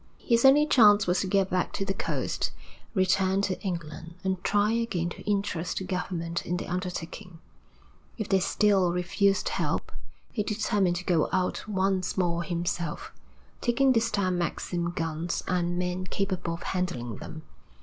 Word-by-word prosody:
His 235 Hz, -2 st, +2 dB
only 285 Hz, +3 st, +7 dB
chance 210 Hz, -8 st, +6 dB
was 180 Hz, +1 st, +2 dB
to 195 Hz, -, -1 dB
get 195 Hz, 0 st, +2 dB
back 180 Hz, 0 st, 0 dB
to 195 Hz, -, -2 dB
the 195 Hz, -, -1 dB
coast, -, -, -2 dB, 0.5 s
return 190 Hz, 0 st, +3 dB
to 190 Hz, -2 st, -1 dB
England, 170 Hz, -2 st, -5 dB
and 190 Hz, -1 st, -1 dB
try 205 Hz, +1 st, +2 dB
again 225 Hz, -7 st, 0 dB
to -, -, -9 dB
interest 190 Hz, -4 st, -1 dB
the -, -, -2 dB
government 175 Hz, -2 st, -3 dB
in 180 Hz, -, -2 dB
the -, -, -4 dB
undertaking; 180 Hz, 0 st, -5 dB, 0.8 s
if 215 Hz, -3 st, -3 dB
they 195 Hz, -, +3 dB
still 190 Hz, -1 st, +3 dB
refused 190 Hz, +2 st, +1 dB
help -, -, -2 dB, 0.4 s
he 215 Hz, -, -1 dB
determined 205 Hz, -3 st, +1 dB
to 180 Hz, +1 st, -5 dB
go 165 Hz, -4 st, +2 dB
out 185 Hz, +3 st, -1 dB
once 190 Hz, -2 st, 0 dB
more 170 Hz, -2 st, +1 dB
himself, 170 Hz, -2 st, -3 dB, 0.5 s
taking 265 Hz, +2 st, +3 dB
this 230 Hz, -2 st, +2 dB
time 185 Hz, -4 st, 0 dB
Maxim 170 Hz, +1 st, -2 dB
guns 165 Hz, 0 st, -2 dB
and 175 Hz, -1 st, 0 dB
men 180 Hz, +1 st, -2 dB
capable 185 Hz, -3 st, -2 dB
of 170 Hz, -, -10 dB
handling 125 Hz, -, -2 dB
them. 155 Hz, -1 st, -9 dB
185 Hz, 160 wpm, -28 LUFS, 175-200 Hz, 0.8 s, only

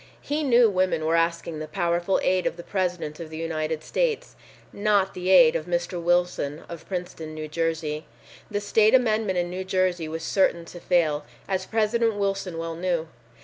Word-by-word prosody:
He 295 Hz, +2 st, -2 dB
knew 245 Hz, -5 st, +5 dB
women 185 Hz, -5 st, +1 dB
were 165 Hz, +1 st, +2 dB
asking 165 Hz, -1 st, 0 dB
the 155 Hz, -, -5 dB
powerful 175 Hz, +1 st, 0 dB
aid 185 Hz, 0 st, +2 dB
of -, -, -3 dB
the 170 Hz, -, -8 dB
President 180 Hz, -6 st, -2 dB
of 165 Hz, -2 st, -7 dB
the 160 Hz, -, -7 dB
United 160 Hz, -1 st, -2 dB
States, 480 Hz, -, -1 dB, 0.4 s
not 200 Hz, -2 st, +2 dB
the 180 Hz, 0 st, -3 dB
aid 170 Hz, -4 st, +7 dB
of 155 Hz, -, -2 dB
Mr. 175 Hz, 0 st, -2 dB
Wilson 175 Hz, -4 st, 0 dB
of 170 Hz, -2 st, -9 dB
Princeton, 175 Hz, -4 st, -5 dB
New 155 Hz, 0 st, -5 dB
Jersey. 160 Hz, -1 st, -2 dB, 0.4 s
The 205 Hz, -1 st, -2 dB
state 215 Hz, +3 st, +4 dB
amendment 220 Hz, -6 st, +2 dB
in 175 Hz, 0 st, -1 dB
New 185 Hz, +1 st, -4 dB
Jersey 185 Hz, -3 st, 0 dB
was 160 Hz, +1 st, -5 dB
certain 170 Hz, -2 st, +1 dB
to 175 Hz, -, -10 dB
fail, 160 Hz, -4 st, +1 dB, 0.2 s
as 190 Hz, -1 st, -2 dB
President 225 Hz, 0 st, +1 dB
Wilson 195 Hz, -3 st, -2 dB
well 165 Hz, 0 st, -3 dB
knew. 170 Hz, -2 st, -1 dB
175 Hz, 180 wpm, -25 LUFS, 165-195 Hz, 0.4 s, aid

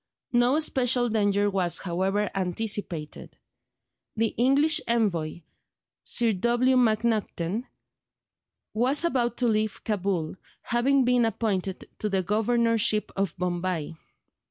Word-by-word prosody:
No 245 Hz, +5 st, +3 dB
special 250 Hz, -5 st, +1 dB
danger 205 Hz, -2 st, +1 dB
was, 190 Hz, -4 st, 0 dB
however, 190 Hz, +3 st, -1 dB
anticipated; 185 Hz, -4 st, -3 dB, 0.8 s
the 225 Hz, 0 st, +1 dB
English 280 Hz, +6 st, +3 dB
envoy, 180 Hz, -9 st, 0 dB, 0.6 s
Sir 235 Hz, -2 st, +2 dB
W. 240 Hz, +6 st, +2 dB
MacNaghten, 220 Hz, -3 st, 0 dB, 1.1 s
was 260 Hz, +8 st, +2 dB
about 240 Hz, -7 st, 0 dB
to 245 Hz, -, +1 dB
leave 215 Hz, -2 st, -1 dB
Cabul, 190 Hz, -6 st, -2 dB, 0.3 s
having 260 Hz, +3 st, +2 dB
been 245 Hz, -1 st, +3 dB
appointed 200 Hz, -4 st, -2 dB
to 210 Hz, -, -2 dB
the 190 Hz, -2 st, 0 dB
Governorship 225 Hz, +1 st, +1 dB
of 195 Hz, -1 st, -2 dB
Bombay. 175 Hz, -3 st, -2 dB
215 Hz, 105 wpm, -26 LUFS, 190-240 Hz, 1.1 s, No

